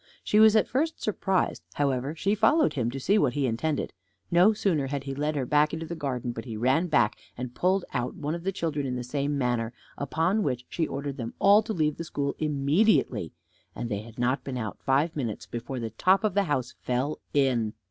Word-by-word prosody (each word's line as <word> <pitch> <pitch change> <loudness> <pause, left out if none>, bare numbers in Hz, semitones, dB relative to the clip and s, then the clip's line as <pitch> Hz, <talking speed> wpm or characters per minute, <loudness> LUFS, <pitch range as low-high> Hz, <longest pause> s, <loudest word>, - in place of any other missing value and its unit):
She 210 - +3
was 220 0 +7
at 215 - +4
first 315 +6 -1
surprised; 195 -3 0
however, 140 +1 0
she 195 +5 0
followed 300 +8 +3
him, 120 -5 0
to 135 +3 -5
see 200 +10 +3
what 130 -8 +2
he 140 -1 0
intended. 135 +6 -1 0.4
No 180 +5 +6
sooner 175 -10 0
had 140 0 -3
he 135 -1 -4
led 150 +2 -1
her 135 -3 -1
back 150 +4 +3
into 165 0 -5
the 165 - -5
garden, 130 -6 -3
but 115 -1 -6
he 115 -4 -5
ran 130 +10 +2
back, 120 -9 +2 0.2
and 125 0 -5
pulled 185 +6 +1
out 125 -1 -2
one 150 +2 -3
of 170 0 -5
the 195 - 0
children 150 -6 -2
in 125 - -2
the 125 - -3
same 140 +3 -1
manner; 120 -3 0 0.3
upon 165 +9 +1
which 125 - -2
she 165 - -1
ordered 140 0 -4
them 115 -3 -5
all 200 +2 +6
to 220 - -5
leave 155 -4 0
the 165 - -4
school 140 -3 -2
immediately, 145 - +2 0.4
and 120 - -4
they 100 -2 -2
had 115 +1 -13
not 125 +2 0
been 130 -2 -4
out 110 -4 -5
five 145 +5 +1
minutes 120 -8 -3
before 120 +2 -5
the 115 -2 -4
top 185 - +3
of 215 -3 +1
the 200 0 +2
house 130 -6 -1
fell 130 +4 -1 0.2
in. 120 -6 +2
140 Hz, 220 wpm, -27 LUFS, 125-170 Hz, 0.4 s, was